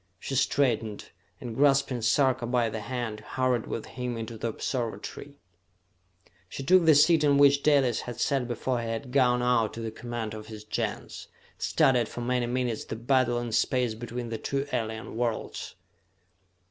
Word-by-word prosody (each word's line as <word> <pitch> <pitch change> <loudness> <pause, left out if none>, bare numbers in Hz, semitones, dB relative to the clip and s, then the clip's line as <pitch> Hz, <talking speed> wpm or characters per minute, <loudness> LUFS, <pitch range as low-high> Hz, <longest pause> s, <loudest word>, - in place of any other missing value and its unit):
She 135 - -5
straightened, 120 -5 0 0.3
and 120 -3 -6
grasping 135 -2 +3
Sarka 130 +1 +2
by 120 -2 +1
the 110 - -4
hand, 115 -1 -4
hurried 130 -2 -1
with 115 - -4
him 125 -2 -5
into 115 0 -6
the 115 - -3
observatory. 120 +4 -4 1.1
She 135 - -6
took 180 +4 +5
the 160 -2 +7
seat 155 +2 +5
in 145 -1 +4
which 140 0 +5
Dalis 140 -6 +3
had 120 -1 -7
sat 135 -1 +1
before 120 +1 -2
he 115 - -4
had 115 +3 -4
gone 125 -2 +3
out 115 -3 +2
to - - -6
the 115 -1 -4
command 120 -2 -5
of 110 0 -8
his 110 -1 -9
Gens, 105 - -4 0.3
studied 125 -4 +2
for 120 - -6
many 125 0 0
minutes 120 -2 -2
the - - -5
battle 120 +1 +2
in 120 -1 -3
space 120 +1 +1
between 120 +1 -6
the 115 -1 -4
two 140 0 -2
alien 110 -1 -3
worlds. 120 -2 -3
120 Hz, 170 wpm, -28 LUFS, 115-130 Hz, 1.1 s, the